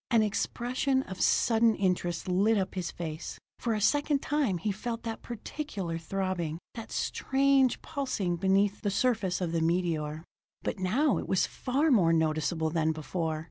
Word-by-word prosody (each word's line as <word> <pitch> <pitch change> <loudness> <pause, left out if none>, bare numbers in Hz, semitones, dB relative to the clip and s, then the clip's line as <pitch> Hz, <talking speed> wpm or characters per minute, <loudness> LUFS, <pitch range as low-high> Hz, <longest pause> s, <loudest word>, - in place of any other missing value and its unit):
An 230 -3 +4
expression 255 +5 0
of 190 -6 -7
sudden 225 -1 +4
interest 175 -3 -1
lit 200 +5 +3
up 190 -2 -1
his 185 -2 -3
face. 160 -2 -6 0.2
For 230 -2 0
a - - -1
second 290 +5 +2
time 280 -11 +1
he 205 +5 -1
felt 230 +3 -4
that 225 -1 -4
particular 210 - -5
throbbing, 175 -2 -2 0.2
that 225 -2 -8
strange 270 -1 +2
pulsing 255 - -2
beneath 195 +3 +2
the 205 - 0
surface 200 -4 +1
of 175 -2 -1
the 165 -1 0
meteor. 160 -2 0 0.4
But - - -2
now 245 +11 +2
it - - -6
was 190 - +3
far 280 +5 0
more 175 -9 +5
noticeable 160 0 +1
than 160 -1 +1
before. 155 +1 -3
195 Hz, 160 wpm, -29 LUFS, 170-240 Hz, 0.4 s, more